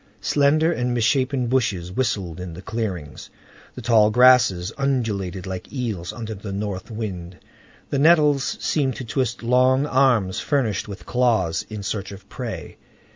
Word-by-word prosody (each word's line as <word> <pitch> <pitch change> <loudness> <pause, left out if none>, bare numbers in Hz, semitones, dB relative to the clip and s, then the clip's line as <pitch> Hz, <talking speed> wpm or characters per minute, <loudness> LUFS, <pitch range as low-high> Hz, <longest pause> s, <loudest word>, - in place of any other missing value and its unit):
Slender 150 +3 +3
and 125 -5 -1
misshapen 130 +2 +1
bushes 105 -8 0
whistled 100 -7 -2
in 90 -2 -7
the 90 - -9
clearings. 95 -11 -5 0.5
The 125 - -8
tall 110 -2 +5
grasses 115 -6 +4
undulated 105 -9 -2
like 95 -1 -6
eels 110 -10 -3
under 110 0 -6
the 100 0 -7
north 100 -1 -4
wind. 95 -6 -6 0.5
The 140 - 0
nettles 150 -3 +4
seemed 135 -4 0
to 130 - -6
twist 120 0 -2
long 130 +3 +3
arms 125 -9 +2
furnished 125 - -1
with 100 -1 -9
claws 110 -10 +1
in 105 -2 -6
search 100 -1 -4
of 100 -1 -12
prey. - - -6
115 Hz, 145 wpm, -22 LUFS, 95-130 Hz, 0.5 s, tall